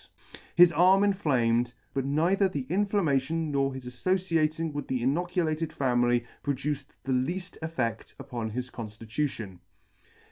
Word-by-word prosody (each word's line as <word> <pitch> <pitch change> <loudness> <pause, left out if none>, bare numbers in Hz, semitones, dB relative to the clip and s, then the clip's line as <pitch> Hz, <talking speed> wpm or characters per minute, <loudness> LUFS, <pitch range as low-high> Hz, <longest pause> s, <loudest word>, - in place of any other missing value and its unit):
His 175 -1 +7
arm 185 +4 +5
inflamed, 125 - +1 0.2
but 135 -1 -1
neither 175 +8 +2
the 140 -8 -4
in 200 +3 +2
flammation 160 -5 0
nor 135 -1 +1
his 130 -1 -8
aflociating 160 +2 0
with 145 -1 -4
the 125 -2 -1
inoculated 165 +2 0
family 120 -2 +1 0.2
pro 140 -1 -1
duced 145 +1 -4
the 135 - -3
leafl: 175 +9 -2
eflfed: 130 -9 -3
upon 125 -5 -4
his 125 +3 -5
conftitution. 110 -2 -4
140 Hz, 135 wpm, -28 LUFS, 125-170 Hz, 0.2 s, His